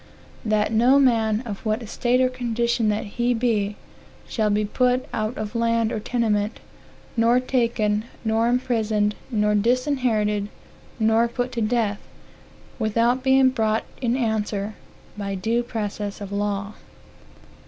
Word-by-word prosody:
"That 215 -1 +1
no 240 +5 +5
man, 225 -5 +3
of 205 -4 -6
what 220 +1 -1
estate 240 +3 +1
or 255 - +4
condition 235 -2 0
that 210 +1 -1
he 240 +4 0
be, 215 -4 0 0.5
shall 215 -2 0
be 210 +1 +1
put 250 +4 +1
out 215 +2 -2
of 215 0 -4
land 230 -1 +1
or - - -2
tenement, 215 -2 -1 0.6
nor 235 +1 +4
taken, 230 -4 0 0.2
nor 225 +1 +2
imprisond, 225 -4 +1 0.2
nor 210 -3 +1
disinherited, 220 -3 +1 0.5
nor 225 +1 +3
put 245 +1 -3
to 235 - -3
death, 215 -2 0 0.8
without 230 +3 +2
being 265 0 +4
brought 220 -3 0 0.2
in 245 0 +1
answer 215 -3 -1 0.5
by 200 -1 -3
due 225 +5 0
process 210 -4 -4
of 200 -1 -7
law." 200 0 -2
225 Hz, 130 wpm, -23 LUFS, 210-245 Hz, 0.8 s, no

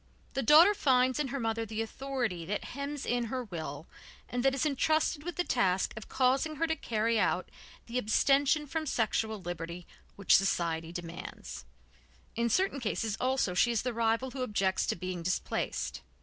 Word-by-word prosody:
The 270 - 0
daughter 315 - +7
finds 260 -6 +3
in 295 - 0
her 275 +2 -3
mother 225 -1 -1
the 220 0 -3
authority 245 -7 -3
that 205 +2 -2
hems 280 +1 -4
in 240 0 0
her 255 +3 -3
will 160 - -6 0.4
and 245 0 -2
that 270 0 +3
is 275 - 0
entrusted 305 +1 +1
with 345 +3 -5
the 355 - +1
task 190 - +1
of 220 - -9
causing 270 +4 +2
her 325 +3 +1
to 320 0 0
carry 225 -4 0
out 180 -2 +1 0.4
the 240 +2 -2
abstention 275 +6 +3
from 310 +2 -3
sexual 220 -3 0
liberty 175 -1 -6 0.3
which 200 - +4
society 165 -4 +1
demands; 170 - -7 0.7
in 235 +1 +1
certain 370 - +1
cases 220 -2 -1
also 255 -7 +1
she 210 +7 +3
is 235 -2 0
the 250 -1 -2
rival 230 +3 0
who 265 - -5
objects 195 -5 0
to - - 0
being 180 0 -4
displaced. 185 +2 -2
235 Hz, 175 wpm, -31 LUFS, 195-275 Hz, 0.7 s, daughter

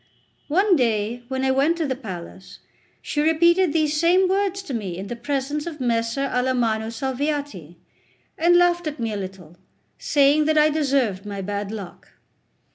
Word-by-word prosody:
One 375 +5 +3
day, 230 -3 0
when 265 0 -2
I 265 - +3
went 285 +6 +2
to 330 - -1
the 265 -2 -2
palace, 190 -6 -9 0.5
she 295 - -1
repeated 340 +3 +3
these 305 -1 +1
same 360 +3 +4
words 390 0 0
to 285 - -7
me 195 -7 -4
in 195 +2 -7
the 240 - -4
presence 285 +4 -3
of 315 -3 -6
Messer 230 +1 0
Alamanno 245 -4 0
Salviati, 265 - -3 0.6
and 345 +2 +4
laughed 350 -1 +2
at 300 -1 -5
me 225 -2 -2
a - - -3
little, 185 -4 -8 0.4
saying 290 +1 +3
that 310 0 +2
I 305 0 +5
deserved 270 -10 0
my 200 -1 -5
bad 205 +1 -4
luck. 200 -5 -9
270 Hz, 165 wpm, -23 LUFS, 220-310 Hz, 0.6 s, I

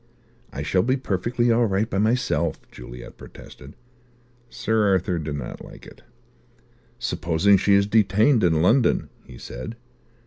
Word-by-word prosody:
"I 70 - -5
shall 90 +4 +1
be 130 +6 0
perfectly 120 +2 -1
all 115 0 +3
right 100 +2 0
by 95 - -2
myself," 115 +5 0
Juliet - - -11
protested. 70 +1 -13 0.7
Sir 110 -1 0
Arthur 95 -2 0
did 75 -2 -4
not 65 -4 -7
like - - -13
it. - - -15 1.0
"Supposing 90 +5 +1
she 100 +1 +3
is 100 0 +3
detained 110 +4 +3
in 80 -2 +2
London," 115 +6 +2 0.2
he 60 - -12
said. 65 - -8
100 Hz, 140 wpm, -23 LUFS, 80-115 Hz, 1.0 s, all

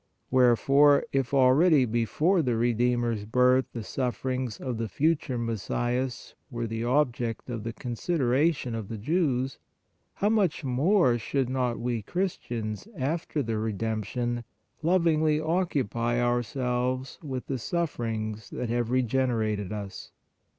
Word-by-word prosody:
Wherefore, 135 +3 +5
if 135 -2 0
already 140 +2 +5
before 120 - +1
the 125 -5 0
Redeemer 120 +1 +1
s 105 -3 -3
birth 125 +3 +3
the 115 - -5
sufferings 130 -1 -2
of 125 -4 -4
the 115 - -1
future 145 - 0
Messias 120 +3 -2 0.2
were 120 -3 -3
the 115 0 -3
object 120 -3 0
of 115 -2 -4
the 115 - -3
i;8 115 - -8
PRAYER - - -17
consideration 130 +1 0
of 110 -3 -4
the 110 - -5
Jews, 135 - 0 0.6
how 205 - +1
much 200 -8 +1
more 135 - +3
should 130 +2 -1
not 125 -2 0
we 120 -1 -1
Christians, 120 - -3
after 150 +1 -1
the 115 -2 -2
Redemption, 110 +3 -2 0.4
lovingly 160 -3 +3
occupy 135 - 0
ourselves 125 +1 -1
with 130 -5 -5
the 135 -2 -3
sufferings 115 - -3
that 125 - -4
have 120 -1 0
re 130 +1 +2
generated 110 -5 0
us 100 -2 -7
125 Hz, 135 wpm, -27 LUFS, 115-140 Hz, 0.6 s, Wherefore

